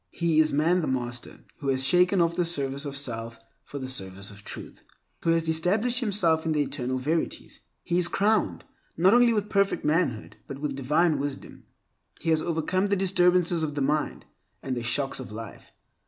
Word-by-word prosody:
He 165 -2 +1
is 155 -1 +4
man 165 +5 +2
the 155 - -2
master 120 -2 -4 0.2
who 140 - -6
has 130 -1 +2
shaken 180 +5 +4
off 170 0 +1
the 180 - +1
service 140 -4 -1
of 140 -1 -3
self 115 -4 -5 0.3
for 145 - -8
the 130 -2 -5
service 100 -5 -3
of 100 0 -14
Truth, - - -8 0.4
who - - -1
has 165 0 +2
established 205 +10 +1
himself 190 -9 +2
in 160 - 0
the 150 -1 +2
Eternal 130 -2 -2
Verities. 155 +6 -3 0.2
He 175 +1 0
is 175 - +3
crowned, 210 +4 +1 0.3
not 185 +5 +5
only 240 0 +6
with 210 -2 0
perfect 200 -5 +1
manhood, 150 -8 0
but 135 - -6
with 140 -1 -3
divine 150 +3 +2
wisdom. 140 -1 -6 0.5
He 165 - -1
has 160 -1 +3
overcome 175 +4 0
the 200 - +1
disturbances 180 -3 +2
of 150 -2 -3
the 145 - -2
mind 150 +2 -1 0.4
and 130 -1 -2
the 120 - -3
shocks 135 +4 -1
of 130 - -8
life. 110 0 -9
155 Hz, 190 wpm, -26 LUFS, 135-180 Hz, 0.5 s, only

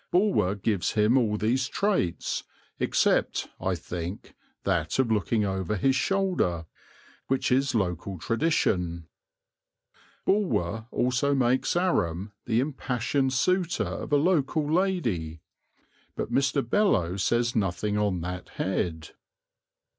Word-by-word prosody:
Bulwer 180 - +2
gives 100 -2 -1
him 110 +3 +3
all 110 -5 +2
these 125 +5 +1
traits, 190 - -1 0.4
except - - +1
(I - - 0
think) 90 +2 -6 0.3
that 85 -5 0
of 130 -4 +2
looking 105 0 +1
over 95 +1 -1
his 130 +7 +2
shoulder, 175 - 0 0.6
which 135 0 0
is 135 0 +2
local 95 -2 -1
tradition. 90 - 0 1.2
Bulwer 115 - 0
also 125 +3 +1
makes 130 +2 +2
Aram 100 - 0 0.2
the 115 -1 +2
impassioned 130 -1 -1
suitor 180 +6 +1
of - - -5
a 145 - +5
local 155 -2 +1
lady; 115 - 0 0.7
but - - -4
Mr. 135 -1 +1
Beloe 115 - +2
says 120 +4 +1
nothing 105 0 0
on 100 -4 0
that 90 +1 -5
head. 85 -4 -2
115 Hz, 115 wpm, -27 LUFS, 90-140 Hz, 1.2 s, a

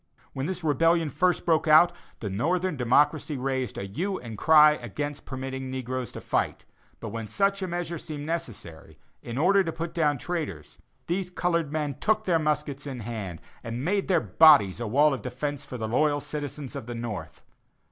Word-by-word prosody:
When 135 +1 -3
this 180 -1 -4
rebellion 165 +1 +2
first 180 +6 +1
broke 160 -1 +2
out, 155 +3 +7 0.3
the 105 - -3
northern 175 - 0
democracy 145 +4 +2
raised 130 -1 -2
a - - -3
hue 180 - -3
and 115 -3 -8
cry 150 +5 +7
against 145 +3 -5
permitting 130 0 -5
the 130 0 -4
negroes 130 0 -4
to - - -7
fight; - - -1 0.3
but - - -6
when 115 -1 -5
such 195 - +1
a 190 - -2
measure 175 -1 -3
seemed 145 -2 -6
necessary, 95 - -6 0.2
in 120 +1 -6
order 195 +6 +4
to 165 - -3
put 165 +1 -5
down 150 -4 +2
traitors, 150 - -5 0.3
these 180 +1 -2
colored 170 -4 -1
men 150 -3 -2
took 220 0 +1
their 170 -3 +3
muskets 150 -2 -2
in 130 -3 -5
hand 105 -7 -6 0.2
and 120 +4 -4
made 200 +2 0
their 180 -3 +3
bodies 105 - +6
a 120 - -3
wall 145 +6 +4
of 135 - -4
defence 140 +3 -4
for 130 - -7
the 110 -2 -3
loyal 145 +5 +2
citizens 145 -3 -6
of 110 - -6
the 120 - -5
north. 115 -4 -6
145 Hz, 190 wpm, -27 LUFS, 125-165 Hz, 0.3 s, out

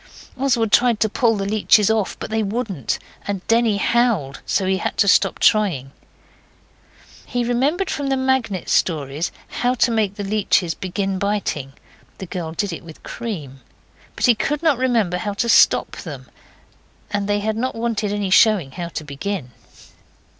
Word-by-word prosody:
Oswald 240 -5 +1
tried 240 -3 +4
to 220 - +4
pull 225 0 +2
the 195 - -2
leeches 210 0 +3
off, 220 -3 -1
but - - -7
they 220 0 +1
wouldn't, 200 - -2 0.3
and 200 -2 -3
Denny 230 -2 +3
howled 210 - +1
so 195 - +1
he 190 0 +1
had - - -3
to 200 - +3
stop - - +4
trying. 180 - +2 1.4
He 245 -1 -1
remembered 275 +11 0
from 285 -1 -2
the 270 -1 +1
Magnet 260 -8 0
Stories 150 -1 0 0.2
how 245 +1 0
to 240 0 +2
make 215 -3 0
the 205 - -5
leeches 195 -4 +1
begin 190 +1 -3
biting 200 -10 -2 0.4
the 190 - -7
girl 175 -3 -5
did 200 0 -2
it 165 - -7
with 160 -2 -13
cream 160 - -6 0.6
but - - 0
he 245 - +6
could 295 +7 -2
not 300 -6 +3
remember 230 -9 +1
how 205 +3 -3
to 235 - -1
stop 230 - +5
them, - - -8 0.8
and 205 -2 -1
they 205 0 +2
had 215 +1 -1
not 255 +4 -2
wanted 225 -3 -1
any 205 -2 -2
showing 195 -9 +4
how 175 +3 -5
to 165 - -6
begin. 145 0 -5
205 Hz, 170 wpm, -21 LUFS, 185-235 Hz, 1.4 s, he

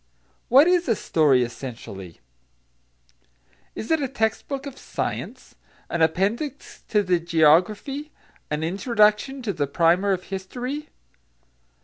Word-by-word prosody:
What 270 +5 +7
is 355 -4 +2
a 225 - +3
story, 145 -9 +3
essentially? 115 - -8 1.5
Is 220 - -5
it 320 -2 +3
a 275 - 0
text 220 -4 -1
book 275 -1 -4
of 275 -2 -8
science, - - -5 0.4
an 170 - -1
appendix 205 - -1
to 210 -2 +2
the 180 -2 +2
geography, 175 - +2 0.4
an 150 +1 -2
introduction 215 +7 +1
to 205 -4 -2
the 145 -4 -1
primer 170 +7 +2
of 185 -1 -1
history? 250 +10 -5
200 Hz, 120 wpm, -24 LUFS, 165-265 Hz, 1.5 s, What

